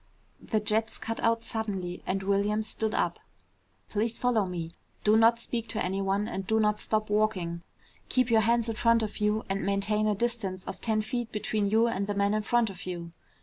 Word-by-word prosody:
The 220 - 0
jets 215 +1 0
cut 225 0 -4
out 230 0 +2
suddenly 195 -6 -3
and 195 +1 -1
Williams 200 +2 +1
stood 220 -1 -2
up. - - 0 0.7
"Please 220 +2 -1
follow 230 -5 +2
me. 170 -2 -4 0.3
Do 210 +1 +5
not 230 +1 +5
speak 230 -1 -3
to 215 - -1
anyone, 195 +2 0
and 195 -4 -4
do 220 +1 +2
not 210 -1 +2
stop 215 -1 -1
walking. 190 -6 0 0.5
Keep 255 -2 +2
your 225 -1 +6
hands 235 +1 +2
in 225 -1 -3
front 230 -1 +4
of 215 - -4
you 210 +1 +1
and 195 +1 -1
maintain 205 +2 +1
a 210 - +2
distance 200 -5 -2
of 190 - -7
ten 215 -2 +1
feet 235 +1 -3
between 210 -1 -1
you 220 +2 +4
and 200 -3 -1
the 205 - -2
man 200 +1 +2
in 215 - +1
front 230 0 +2
of 185 0 -10
you." 170 -2 -5
215 Hz, 200 wpm, -29 LUFS, 195-225 Hz, 0.7 s, your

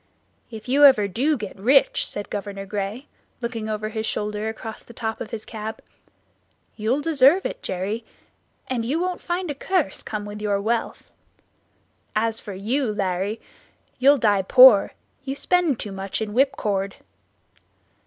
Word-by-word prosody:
"If 220 -1 -10
you 280 +3 +3
ever 260 -8 +7
do 275 +10 0
get 210 -4 -7
rich," 255 +8 +3
said 205 - -6
Governor 200 -1 -5
Gray, 205 +6 -4 0.3
looking 235 -3 -4
over 215 0 -3
his 220 0 -3
shoulder 210 +1 -2
across 220 0 -7
the 235 - -16
top 225 -2 -4
of - - -5
his 220 -2 -6
cab, 220 0 -6 1.0
"you'll 235 +6 0
deserve 300 +3 +4
it, - - -4
Jerry, 200 - -3 0.6
and 250 -3 -2
you 275 +8 -1
won't 360 0 -2
find 350 -1 -2
a - - -2
curse 315 - -1
come 210 -1 -5
with 205 0 -8
your 205 -1 0
wealth. 225 +3 -2 1.0
As 225 +1 0
for 205 -3 -8
you, 230 +5 -1
Larry, 200 +1 -2 0.6
you'll 280 +3 +6
die 205 -5 +3
poor; 250 +1 +7 0.3
you 270 0 -4
spend 340 -4 +1
too 205 - -5
much 195 0 -4
in 215 -2 -4
whipcord." 205 -7 0
220 Hz, 155 wpm, -23 LUFS, 205-265 Hz, 1.0 s, ever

